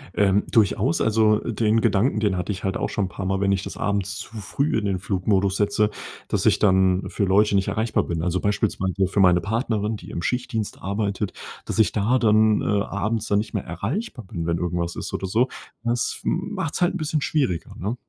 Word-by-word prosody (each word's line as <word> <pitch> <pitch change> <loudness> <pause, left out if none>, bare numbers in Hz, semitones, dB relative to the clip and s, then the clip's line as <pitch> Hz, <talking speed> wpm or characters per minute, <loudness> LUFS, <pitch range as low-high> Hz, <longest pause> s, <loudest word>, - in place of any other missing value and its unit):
Ähm, 100 0 +3
durchaus. 105 -7 +2
Also, 110 -1 +3
den 115 -1 +1
Gedanken, 110 +2 +2
den 100 -4 +1
hatte 90 +3 -2
ich 95 +2 -6
halt 95 - -1
auch - - -2
schon 95 -2 -1
paarmal, 95 0 -2
wenn 100 0 +2
ich 95 0 0
das - - -7
abends 100 -1 -1
zu 115 - -9
früh 140 +9 -1
in 105 - -2
den 95 -2 0
Flugmodus 95 0 0
setze, 105 +1 +2 0.4
dass - - -1
ich - - +4
dann 95 -1 +3
für 100 - 0
Leute 100 +2 +3
nicht 95 - +2
erreichbar 110 +2 0
bin. 85 -2 -3
Also, 90 +2 0
beispielsweise 95 -2 0
für 95 +2 -1
meine 90 -2 +5
Partnerin, 110 0 -1
die - - -12
im 85 - -4
Schichtdienst 115 +1 -2
arbeitet, 100 0 -2 0.3
dass - - -3
ich 105 - +4
da 110 +5 +2
dann, 110 -1 +4
äh, - - -3 0.2
abends 110 0 -2
dann 100 - +2
nicht 105 +1 -5
mehr 105 - -2
erreichbar 115 - -4
bin, 85 -4 -5
wenn 85 - +1
irgendwas 85 0 -2
ist - - -6
oder 95 - -2
so. 115 +7 +2 0.4
Das 120 0 -1
macht's 160 +2 -2
halt 175 - +3
'n - - 0
bisschen 155 -1 -1
schwieriger, 135 - -1
ne? 105 +7 -3
100 Hz, 205 wpm, -23 LUFS, 95-110 Hz, 0.4 s, meine